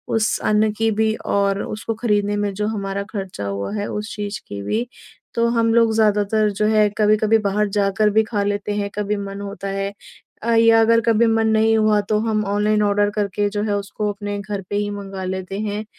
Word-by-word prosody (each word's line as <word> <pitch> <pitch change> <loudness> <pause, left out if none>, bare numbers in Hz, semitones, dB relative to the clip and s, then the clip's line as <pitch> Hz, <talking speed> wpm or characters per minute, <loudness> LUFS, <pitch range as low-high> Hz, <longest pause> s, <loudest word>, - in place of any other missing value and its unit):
उस 220 -1 +1
अन्न 215 0 +3
की 225 +1 0
भी 220 0 +2
और 200 0 +1
उसको 225 +1 -4
खरीदने 205 -2 0
में 205 -1 -1
जो 210 +1 -1
हमारा 200 -2 -3
खर्चा 190 - -5
हुआ 100 0 -3
है 205 -1 -2
उस 210 +1 -5
चीज़ 205 -1 -4
की 100 0 -6
भी। 225 - -1 0.5
तो 235 0 +2
हम 230 0 +2
लोग 230 -1 +4
ज़्यादातर 210 0 +2
जो 210 - +2
है 215 -1 +4
कभी-कभी 215 +1 +3
बाहर 210 0 0
जाकर 200 +1 +2
भी 220 +1 +3
खा 210 -2 -2
लेते 205 0 -2
हैं, 205 -1 -2
कभी 210 0 -1
मन 200 0 -6
होता 200 0 -6
है 195 +1 -3 0.5
अ, 235 - 0
या 230 0 +5
अगर 230 +1 +4
कभी 230 +1 +4
मन 225 0 +2
नहीं 220 0 +3
हुआ 215 -1 +3
तो 210 +1 0
हम 215 -1 0
ऑनलाइन 210 +1 +1
ऑर्डर 205 0 +2
करके 205 0 0
जो 205 0 -2
है 210 -1 0
उसको 205 +1 -3
अपने 205 0 -5
घर 200 0 -4
पे - - -2
ही 205 0 0
मँगा 195 -2 -6
लेते 190 +1 -4
हैं। 210 0 -3
210 Hz, 210 wpm, -21 LUFS, 200-220 Hz, 0.5 s, या